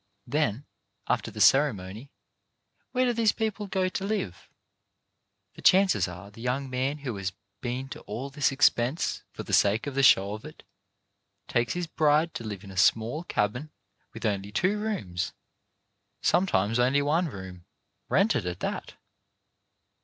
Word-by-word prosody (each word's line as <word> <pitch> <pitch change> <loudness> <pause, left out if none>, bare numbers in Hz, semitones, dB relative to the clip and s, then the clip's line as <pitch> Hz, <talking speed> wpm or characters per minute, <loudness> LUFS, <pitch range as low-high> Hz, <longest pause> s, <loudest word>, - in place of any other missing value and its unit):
Then, 135 -2 0 0.4
after - - 0
the - - -9
ceremony, 115 -4 +3 0.8
where 255 0 +2
do 245 - +2
these 225 -2 +3
people 215 -2 -2
go 190 -1 0
to 190 +1 -3
live? 195 - -3 1.0
The - - -13
chances 190 - +5
are 90 +3 -9
the 115 - -13
young 130 +2 -2
man 130 +3 -1
who 135 -6 -5
has 95 -1 -3 0.3
been 125 +2 -3
to - - -8
all 125 +7 -4
this 145 0 +1
expense 135 +1 +2
for - - -7
the - - -7
sake 105 +3 +4
of 145 - -4
the 135 - +1
show 100 -6 +5
of 105 - -7
it, - - -12 0.8
takes 120 -1 +1
his 175 0 -2
bride 155 +1 +2
to - - -5
live 105 -3 -6
in 100 - -10
a 95 - -10
small 115 - +2
cabin 125 +7 -1 0.4
with - - -7
only 100 -1 -1
two 185 - +1
rooms 180 - -3 0.4
— - - -50
sometimes 115 - +2
only 130 +3 +3
one 160 +5 +2
room 95 - -9 0.2
— - - -50
rented 90 - +2
at 90 0 -4
that. - - -4
130 Hz, 160 wpm, -27 LUFS, 105-160 Hz, 1.0 s, chances